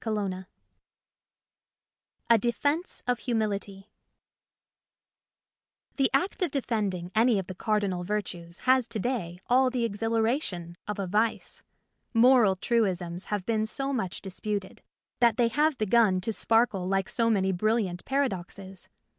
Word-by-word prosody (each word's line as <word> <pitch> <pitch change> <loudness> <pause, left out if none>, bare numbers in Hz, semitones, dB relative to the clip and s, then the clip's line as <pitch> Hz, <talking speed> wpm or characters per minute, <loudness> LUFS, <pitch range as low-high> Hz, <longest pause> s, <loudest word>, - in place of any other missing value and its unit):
^ 200 -4 -2 1.9
DEFENCE 285 - -1
OF 245 -1 0
HUMILITY 210 -4 -3 2.1
THE 270 -2 +3
act 285 +10 0
of 360 - +2
defending 210 -10 -2
any 225 0 +4
of 190 - -2
the 185 - -7
cardi 210 +2 0
nal 180 -1 -3
virtues 180 -3 -4
has 255 -2 +3
to 230 - -5
day 195 -7 -3
all 255 +1 +4
the 245 -2 0
exhilara 225 +5 0
tion 170 - -6
of 210 0 -3
a 200 - -2
vice. 215 +5 0 0.5
Moral 235 -4 +6
truisms 185 -5 -1
have 205 -3 -3
been 220 -1 0
so 270 +4 -2
much 190 -8 -3
disputed 200 0 -4 0.4
that 235 -3 +4
they 235 -1 +3
have 295 +4 +1
begun 215 -3 +3
to 225 +4 -2
sparkle 225 -5 +1
like 195 0 0
so 230 -2 +1
many 190 -3 +2
brilliant 195 -1 0
paradoxes. 195 -8 -3
215 Hz, 130 wpm, -28 LUFS, 190-240 Hz, 2.1 s, Moral